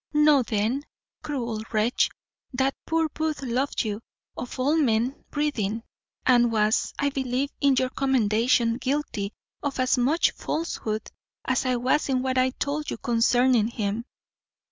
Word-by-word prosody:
"Know, 300 -2 +5
then, 225 +3 0 0.4
cruel 235 -7 -3
wretch, 220 +2 +2 0.4
that 265 +1 +1
poor 325 0 +2
Booth 310 -1 -3
loved 260 +3 0
you 215 -1 -3 0.3
of 250 +1 -6
all 280 +5 +2
men 250 -3 +1
breathing, 230 -8 -1 0.4
and 240 -2 +5
was, 215 0 +2
I 285 0 +1
believe, 265 +1 -1
in 280 -1 +4
your 255 0 +1
commendation 235 -2 +2
guilty 260 -8 -2 0.3
of 285 -2 -3
as 255 0 +2
much 285 +7 +3
falsehood 220 -9 -3 0.3
as 260 0 0
I 255 - +2
was 260 +5 +1
in 255 -1 +1
what 260 -1 +1
I 255 0 +3
told 290 +3 -3
you - - -3
concerning 240 -1 +3
him. 220 0 -3
255 Hz, 145 wpm, -26 LUFS, 230-280 Hz, 0.4 s, Know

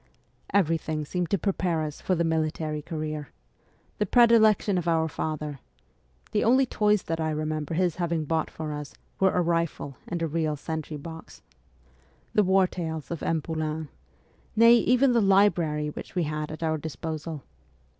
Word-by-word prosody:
Everything 160 -4 +1
seemed 175 +2 -2
to 200 - +2
prepare 180 -3 0
us 150 -1 -6
for 185 - +1
the 170 - +1
military 155 -1 -1
career: 155 -2 -5 0.7
the 210 - +2
predilection 220 -4 +5
of 175 - -5
our 160 -1 +2
father 150 -2 -4 0.7
(the 210 - +1
only 260 +4 +5
toys 210 -4 +2
that 165 0 -3
I 160 -1 0
remember 155 0 -2
his 175 -1 +1
having 170 -3 -1
bought 160 +1 0
for 155 -1 -5
us 150 -1 -7 0.2
were 190 - +5
a 180 - +3
rifle 165 -5 -1
and 170 -1 -3
a - - +1
real 155 -1 -1
sentry 155 +1 -5
box); 160 +2 -10 0.9
the 210 - +5
war 190 -1 +4
tales 160 -4 -5
of 170 - -4
M. 160 -2 0
Poulain; 155 -1 -3 0.7
nay, 230 +1 +7
even 250 +3 +4
the 235 -1 +3
library 175 -7 +3
which - - -9
we 180 - +1
had 150 0 -3
at 155 +1 -6
our 160 -1 0
disposal. 160 -1 -5
160 Hz, 165 wpm, -27 LUFS, 155-185 Hz, 0.9 s, nay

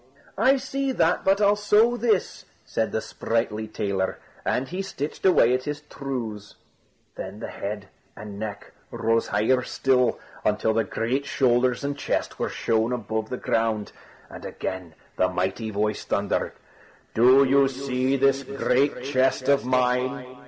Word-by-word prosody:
"I 270 +2 +5
see 270 +1 -2
that, 170 -6 +2
but 195 +1 +3
I'll 205 0 +5
sew 210 +3 +4
this!" 230 -5 0 0.2
said 110 - -1
the 110 - -1
sprightly 110 -1 -2
tailor; 100 -3 -2 0.3
and 130 +1 0
he 180 +5 -4
stitched 175 -2 -3
away 125 -9 +5
at 130 0 -1
his 150 0 -4
trews. 115 -7 -5 0.6
Then - - -7
the - - -6
head 105 0 -5 0.3
and 105 -1 -8
neck 105 -2 -6 0.2
rose 115 +1 0
higher 110 +5 +2
still, 125 -1 +1 0.2
until 105 +1 +1
the 115 0 +1
great 130 +5 -2
shoulders 125 0 +2
and 140 0 -1
chest 145 - -2
were - - -1
shown 115 +1 0
above 110 -2 -3
the 125 - -3
ground. 110 -3 0 0.4
And - - -11
again 90 -3 -5 0.2
the 90 - +3
mighty 95 +5 -2
voice 105 0 -1
thundered: 100 0 -1 0.6
"Do 130 +4 +6
you 135 0 +4
see 135 0 -1
this 135 0 +3
great 135 0 0
chest 130 -1 +1
of 140 -2 +3
mine?" 125 +1 +1
125 Hz, 150 wpm, -25 LUFS, 110-140 Hz, 0.6 s, Do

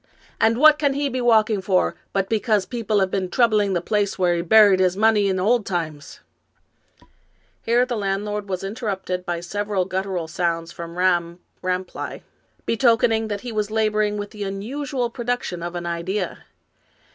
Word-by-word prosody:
And 225 +1 +3
what 305 +2 +6
can 280 -2 +1
he 285 0 0
be 255 -1 -3
walking 220 -3 +3
for 190 -1 +1 0.2
but 195 -1 0
because 215 -2 +1
people 220 -3 -1
have 190 -1 0
been 190 -2 -1
troubling 215 -5 +2
the 175 - 0
place 205 -1 0
where 180 -2 +2
he 170 - -1
buried 200 +1 +6
his 185 0 +2
money 215 -1 +3
in 190 -1 0
old 220 +4 +2
times? 160 -6 -5 0.7
" - - -34
Here 240 +2 +4
the 250 -1 -3
landlord 205 0 -2
was 185 -1 -3
interrupted 195 -4 -4
by 170 -1 -2
several 205 +1 -2
guttural 185 -2 -3
sounds 165 0 -2
from 170 0 -8
Ramm 175 -2 +1 0.2
Rapelye, 185 0 -4 0.4
betokening 225 -1 +2
that 205 -1 -4
he 245 - -6
was 210 -1 -1
labor 215 -1 +1
ing 210 0 0
with 205 0 -5
the 210 -2 -6
unusual 240 +6 -3
production 240 -8 -3
of 175 +1 -5
an 175 0 -4
idea. 170 +3 -3
205 Hz, 170 wpm, -22 LUFS, 185-225 Hz, 0.7 s, what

